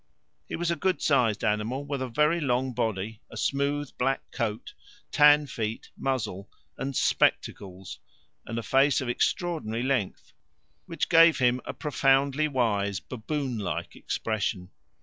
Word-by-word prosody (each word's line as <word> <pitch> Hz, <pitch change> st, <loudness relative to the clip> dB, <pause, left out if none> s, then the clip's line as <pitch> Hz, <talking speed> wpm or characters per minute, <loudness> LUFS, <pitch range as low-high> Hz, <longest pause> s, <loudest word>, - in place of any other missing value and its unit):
He -, -, -4 dB
was 170 Hz, 0 st, -1 dB
a -, -, +1 dB
good 185 Hz, +4 st, 0 dB
sized 125 Hz, -7 st, +2 dB
animal, 110 Hz, +7 st, -1 dB
with 140 Hz, -2 st, -3 dB
a 130 Hz, -, -2 dB
very 150 Hz, +7 st, +2 dB
long 130 Hz, -1 st, 0 dB
body, 110 Hz, -2 st, -2 dB
a -, -, -10 dB
smooth 140 Hz, +1 st, -1 dB
black 135 Hz, +2 st, -1 dB
coat, 115 Hz, -3 st, -3 dB, 0.4 s
tan 150 Hz, 0 st, +6 dB
feet, 115 Hz, -4 st, -5 dB
muzzle, 105 Hz, -7 st, -3 dB, 0.3 s
and 135 Hz, 0 st, -4 dB
"spectacles," 95 Hz, -5 st, 0 dB, 0.5 s
and 115 Hz, -, -4 dB
a 115 Hz, -, -3 dB
face 135 Hz, +3 st, +3 dB
of 130 Hz, -3 st, -3 dB
extraordinary 125 Hz, -5 st, -1 dB
length, 130 Hz, -7 st, -2 dB, 0.5 s
which 165 Hz, -2 st, -2 dB
gave 165 Hz, -1 st, +6 dB
him 125 Hz, -1 st, +2 dB
a -, -, -5 dB
profoundly 140 Hz, 0 st, +2 dB
wise 105 Hz, -8 st, 0 dB
baboon 130 Hz, 0 st, -4 dB
like 100 Hz, -, -4 dB
expression. 100 Hz, -4 st, -3 dB
130 Hz, 140 wpm, -27 LUFS, 110-145 Hz, 0.5 s, tan